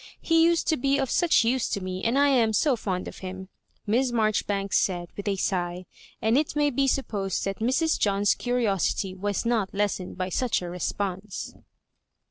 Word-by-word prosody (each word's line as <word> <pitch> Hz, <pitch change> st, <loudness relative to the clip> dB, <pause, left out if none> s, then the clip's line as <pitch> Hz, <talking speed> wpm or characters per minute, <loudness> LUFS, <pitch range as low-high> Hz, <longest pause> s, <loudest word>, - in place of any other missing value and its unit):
He 330 Hz, -1 st, +3 dB
used 335 Hz, 0 st, +3 dB
to 315 Hz, -, +2 dB
be 275 Hz, +2 st, +1 dB
of 270 Hz, -3 st, -1 dB
such 345 Hz, -8 st, +4 dB
use 245 Hz, +1 st, +1 dB
to -, -, -1 dB
me, 185 Hz, 0 st, -5 dB
and 235 Hz, +4 st, +1 dB
I 285 Hz, 0 st, +5 dB
am 235 Hz, -5 st, +3 dB
so 275 Hz, +5 st, +3 dB
fond 190 Hz, -5 st, -3 dB
of -, -, -9 dB
him," 190 Hz, 0 st, -7 dB, 0.4 s
Miss 245 Hz, +4 st, +1 dB
Marjoribanks 210 Hz, -3 st, +1 dB
said, 175 Hz, -2 st, -1 dB
with 200 Hz, -, -6 dB
a 200 Hz, -, +1 dB
sigh; 180 Hz, -1 st, -2 dB, 0.3 s
and 225 Hz, +5 st, +3 dB
it 300 Hz, -, -2 dB
may 295 Hz, -1 st, +2 dB
be 275 Hz, +1 st, +1 dB
supposed 205 Hz, -8 st, -1 dB
that 195 Hz, 0 st, -3 dB
Mrs. 265 Hz, +8 st, +1 dB
John's 200 Hz, 0 st, +2 dB
curiosity 210 Hz, -6 st, 0 dB
was 200 Hz, +3 st, -2 dB
not 225 Hz, -5 st, 0 dB
less 205 Hz, 0 st, 0 dB
ened 180 Hz, -, -8 dB
by 185 Hz, 0 st, -2 dB
such 235 Hz, 0 st, 0 dB
a 175 Hz, -, -5 dB
response. 190 Hz, +2 st, -4 dB
210 Hz, 190 wpm, -26 LUFS, 190-260 Hz, 0.4 s, I